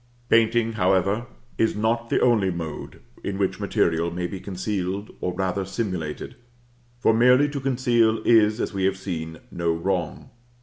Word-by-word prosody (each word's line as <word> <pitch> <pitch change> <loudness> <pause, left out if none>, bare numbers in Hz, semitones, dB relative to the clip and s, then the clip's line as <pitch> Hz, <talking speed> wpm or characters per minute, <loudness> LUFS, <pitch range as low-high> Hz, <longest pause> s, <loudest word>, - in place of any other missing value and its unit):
Painting, 115 0 +3
however, 100 +2 +1 0.3
is 110 - +2
not 115 +2 0
the - - +2
only 110 -6 +3
mode 80 -4 -6 0.2
in 100 - -3
which 95 -1 -1
material 85 0 +1
may 90 +1 -3
be 95 +2 -5
concealed, 95 +1 -3
or 90 - -1
rather 95 +1 -1
simulated; 95 -6 -4 0.6
for 115 -2 +3
merely 125 +5 +5
to 145 -1 -4
conceal 120 -4 +2
is, 110 -1 +4
as - - -2
we 95 -1 0
have 95 0 +1
seen, 80 -4 -5
no 85 -1 0
wrong. 85 0 -2
100 Hz, 150 wpm, -24 LUFS, 90-115 Hz, 0.6 s, merely